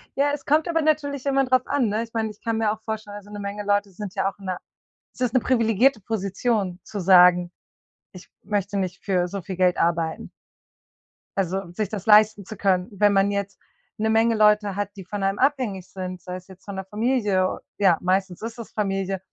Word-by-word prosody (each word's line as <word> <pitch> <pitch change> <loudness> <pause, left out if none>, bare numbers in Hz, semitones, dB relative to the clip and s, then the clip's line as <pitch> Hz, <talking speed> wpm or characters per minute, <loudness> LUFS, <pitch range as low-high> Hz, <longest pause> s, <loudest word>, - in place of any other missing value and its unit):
Ja, 285 +1 +2
es 290 - -5
kommt 305 +4 +2
aber 330 -1 +1
natürlich 285 -3 0
immer 275 -1 +2
drauf 255 0 +3
an, 275 -6 +1
ne? 215 +2 -1
Ich 230 - -12
meine, 220 -1 -1
ich 210 - -13
kann 230 -1 -1
mir 220 -2 +2
auch 220 0 -6
vorstellen 215 -2 -5
also 205 0 -13
'ne 205 - -7
Menge 205 +1 -4
Leute 205 0 +1
sind 195 0 -7
ja 195 - +1
auch 195 - -14
in 195 - -12
'ner 185 -1 -2 0.6
Es - - -15
ist 245 -1 +1
'ne 255 - +5
privilegierte 230 0 +2
Position 200 -1 -1
zu 210 -2 -6
sagen: 180 -1 +6 0.6
„Ich 185 - -12 0.2
möchte 205 0 -2
nicht 185 -1 -3
für 180 -3 +1
so 195 +2 -5
viel 185 +2 -6
Geld 180 -1 +3
arbeiten." 165 -1 -1 1.1
Also, 190 -1 -1
sich 205 +2 -3
das 205 -4 -5
leisten 210 -2 +5
zu 215 - -8
können, 185 -2 +1
wenn 205 0 +3
man 195 +1 +3
jetzt 200 -1 -3 0.4
'ne 220 +1 0
Menge 225 +1 +3
Leute 210 -2 +3
hat, 205 0 -2
die 195 - -9
von 200 +1 -4
einem 195 +1 0
abhängig 250 -10 0
sind, 185 -1 -6
sei 180 0 -6
es 185 +1 -10
jetzt 190 -1 -16
von 200 - -6
der 190 0 -5
Familie 210 -3 0 0.2
ja, 190 -5 +4
meistens 185 -1 0
ist 230 +1 -6
es 230 - -8
Familie 195 -2 -1
205 Hz, 215 wpm, -24 LUFS, 190-225 Hz, 1.1 s, sagen